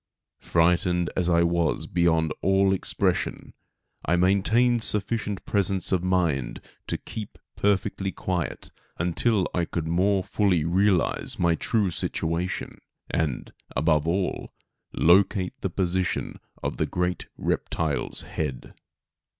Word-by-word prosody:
Frightened 90 +1 +2
as 90 -1 +1
I 85 -1 +4
was 85 -1 +1
beyond 80 -2 +1
all 95 0 +3
expression, 95 - -1 0.5
I 85 - +2
maintained 110 +6 +3
sufficient 105 -1 -1
presence 100 -3 0
of 90 -2 +1
mind 85 -10 0 0.3
to - - -1
keep 110 -2 -8 0.2
perfectly 100 -1 0
quiet 90 -4 -3 0.3
until 90 +4 +1
I 85 -1 +1
could 85 -1 -3
more 95 +3 +2
fully 90 -6 +1
realize 95 +1 +1
my 85 -1 +3
true 100 +2 0
situation 85 +2 -2 0.3
and, 75 -6 -2 0.2
above 75 +2 +2
all, 90 +2 -1 0.4
locate 95 +2 +3
the 95 - -1
position 90 0 -1 0.2
of - - -2
the - - 0
great 90 0 -2
reptile's 80 -4 -2
head. 65 -5 -5
90 Hz, 115 wpm, -25 LUFS, 85-95 Hz, 0.5 s, I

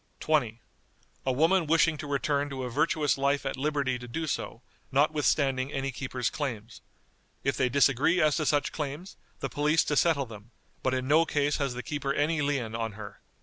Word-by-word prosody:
"20. 120 -8 +1 0.7
A - - +4
woman 165 +6 +3
wishing 165 0 +3
to 150 - -7
return 145 0 0
to 135 -2 -5
a 125 - -4
virtuous 150 +1 +1
life 140 +1 +1
at 135 - -2
liberty 140 -2 -1
to 125 - -9
do 160 +7 -3
so, 125 -5 -4 0.3
notwithstanding 140 -2 +2
any 135 0 -2
keeper's 125 -2 -3
claims. 115 -6 -5 0.6
If - - +1
they 130 - +1
disagree 140 +6 +3
as 155 -3 +3
to 155 - -1
such 145 -1 +1
claims, 150 +5 -5 0.3
the - - -1
police 150 +2 +2
to 150 - -1
settle 145 -2 +3
them, 110 -1 -12 0.3
but 130 0 0
in 130 0 -2
no 155 +4 +5
case 145 -2 0
has 135 -3 -2
the 125 - -5
keeper 140 -2 -2
any 150 +2 +1
lien 135 -6 -1
on 115 -1 -3
her. 105 0 -10
140 Hz, 190 wpm, -28 LUFS, 130-150 Hz, 0.7 s, no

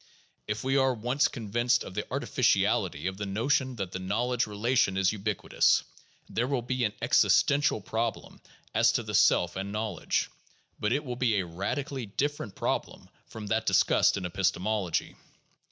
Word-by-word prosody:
If 105 +1 -3
we 135 +1 +1
are 130 -1 +3
once 125 +6 +1
convinced 120 +2 0
of - - -9
the - - -5
artificiality 75 +4 +1
of 95 0 -2
the 100 0 -4
notion 130 +5 0
that 95 -5 -4
the 95 - -5
knowledge 120 +6 0
rela 105 +5 -2
tion 95 -6 +3
is 95 -1 +3
ubiquitous, 105 -2 +1 0.4
there 120 +2 -1
will 130 -3 -1
be 125 +1 -1
an 105 - -2
existential 145 -4 +3
problem 110 +4 -4 0.3
as - - +4
to - - 0
the - - -6
self 90 0 +3
and 95 +1 -4
knowledge; 105 -4 -2 0.5
but 105 - 0
it 145 +4 0
will 125 -2 -5
be 120 -4 +2
a 95 - -2
radically 115 - -4
different 135 -1 -3
problem - - -3 0.2
from 110 -2 -8
that 110 +2 -1
discussed - - +3
in 95 - -4
epistemology. 95 +1 -1
110 Hz, 165 wpm, -28 LUFS, 95-125 Hz, 0.5 s, as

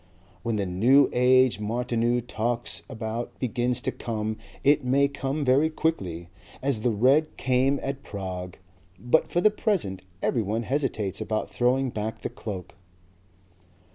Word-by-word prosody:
When 115 -2 -1
the 100 -2 0
New 120 +10 +4
Age 125 -1 +4
Martineau 120 +2 0
talks 120 0 -2
about 115 -1 -5
begins 125 0 -1
to - - -1
come 110 -1 -3 0.3
it 145 0 +4
may 135 +3 +3
come 140 +1 -3
very 135 +5 +4
quickly 90 - -2 0.3
as 130 -5 0
the 120 - +2
red 130 +8 +3
came 130 +2 +2
at 135 0 -3
Prague. 95 -6 -6 0.4
But 120 - +2
for 175 - 0
the 215 - +5
present 185 - -1 0.2
everyone 115 0 0
hesitates 115 -7 -1
about 110 0 -2
throwing 130 +1 +1
back 110 0 -4
the - - -3
cloak." 95 -5 -7
120 Hz, 140 wpm, -26 LUFS, 110-135 Hz, 0.4 s, the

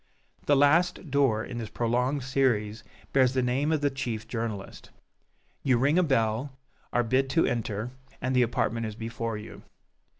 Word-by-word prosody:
The 145 - +5
last 160 +3 +3
door 130 -6 +2
in 120 - -6
this 110 -2 -5
prolonged 125 +4 0
series 120 -5 0 0.3
bears 130 -2 +4
the 130 - +2
name 135 +5 +1
of 155 -2 +1
the 145 -1 +2
chief 120 -4 -4
journalist. 115 -4 -5 0.7
You 130 -3 +3
ring 145 +8 +3
a - - +4
bell, 130 -1 0 0.3
are 120 - +2
bid 130 +3 +1
to 165 +4 +3
enter, 110 0 -2 0.3
and 130 +1 -1
the 125 - +5
apartment 115 -1 0
is 105 - -6
before 115 0 -4
you. 105 - -10
125 Hz, 165 wpm, -28 LUFS, 115-135 Hz, 0.7 s, The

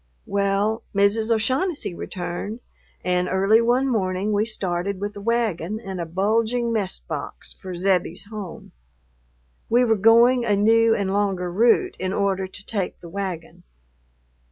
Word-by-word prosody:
Well, 200 +2 0
Mrs. 205 +3 +2
O'Shaughnessy 260 - 0
returned, 185 +6 -5 0.4
and 180 0 +1
early 195 +4 +4
one 245 +3 +2
morning 195 -4 0
we 210 +1 +1
started 190 -2 -2
with 205 +1 -4
a 205 - -7
wagon 215 -4 -1
and 190 -5 -6
a 170 - -4
bulging 225 +6 0
mess 205 -4 -2
box - - -7
for 185 -1 -8
Zebbie's 180 0 0
home. 205 -5 -8 1.0
We 245 +2 +4
were 225 -2 +3
going 235 +4 +5
a 210 -3 +2
new 225 +2 +4
and 195 -1 -1
longer 195 -3 0
route 235 - +3
in 185 +1 -2
order 195 -2 0
to 195 +1 -7
take 200 -5 -3
the 170 - -11
wagon. 185 -3 -5
200 Hz, 145 wpm, -23 LUFS, 185-225 Hz, 1.0 s, going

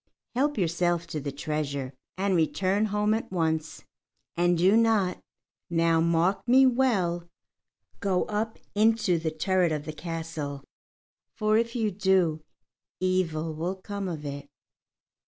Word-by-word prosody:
Help 285 +4 +1
yourself 175 -1 +1
to 165 -2 -4
the 140 0 -4
treasure, 140 -2 -3 0.2
and 195 0 +1
return 190 +5 +1
home 210 0 +1
at 220 -2 -3
once. 160 -3 -1 0.5
And 175 0 +2
do 185 +5 +4
not 220 -5 +2 0.5
now 165 -1 +3
mark 170 +3 +2
me 260 +2 +6
well 195 -10 +1 0.7
go 190 -2 +1
up 220 +1 -3 0.2
into 210 -4 +3
the 160 0 -1
turret 175 +2 +1
of 150 -1 -2
the 155 - -5
castle; 160 -4 -5 0.7
for 215 -1 +2
if 230 +1 +1
you 220 -3 0
do, 185 -5 +2 0.6
evil 165 -4 0
will 170 +5 -3
come 200 +1 -5
of 155 -4 -5
it." 140 0 -6
180 Hz, 135 wpm, -27 LUFS, 160-210 Hz, 0.7 s, me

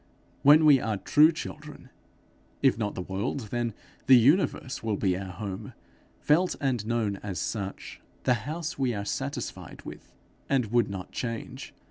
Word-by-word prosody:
When 150 +3 +7
we 145 -3 +7
are 110 -3 -2
true 150 - +5
children, 150 -4 -9 0.7
if - - +5
not 105 -2 -3
the 90 - -4
world, 95 +9 -3
then 120 -3 -2 0.3
the 130 -1 +9
universe 135 - +2
will 110 -2 -1
be 95 -2 +1
our 95 0 -5
home, 100 +2 -6 0.5
felt 175 +5 +2
and 130 -6 0
known 110 -4 0
as 95 -2 -6
such, 100 -3 -5 0.2
the 125 - +3 0.2
house 160 -2 -4
we 125 -4 +1
are 100 0 -4
satisfied - - -5
with, - - -10 0.4
and 125 -6 +1
would 120 -2 +3
not 95 -2 -6
change. 115 -2 -6
115 Hz, 155 wpm, -27 LUFS, 100-140 Hz, 0.7 s, the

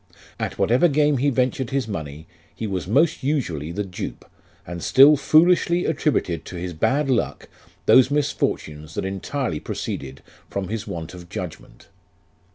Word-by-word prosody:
At - - -3
whatever 120 - +4
game 150 -1 +2
he 145 +3 +2
ventured 130 -1 0
his 135 -4 -1
money, 80 -6 -6 0.3
he 115 - -4
was 95 -4 -3
most 150 - +2
usually 90 - -2
the 105 +4 -2
dupe, 90 -2 -7 0.4
and 85 0 -6
still 140 - +7
foolishly 170 +4 +3
attributed 140 - 0
to - - -8
his 90 0 -4
bad 140 - +1
luck 130 -3 -1 0.4
those 130 0 +6
misfortunes 75 - -2
that - - -2
entirely 95 - -3
proceeded 70 -2 -5 0.3
from 95 -2 -4
his 110 0 -4
want 80 -1 -6
of 85 -1 -11
judgment. - - -8
115 Hz, 150 wpm, -23 LUFS, 85-145 Hz, 0.4 s, still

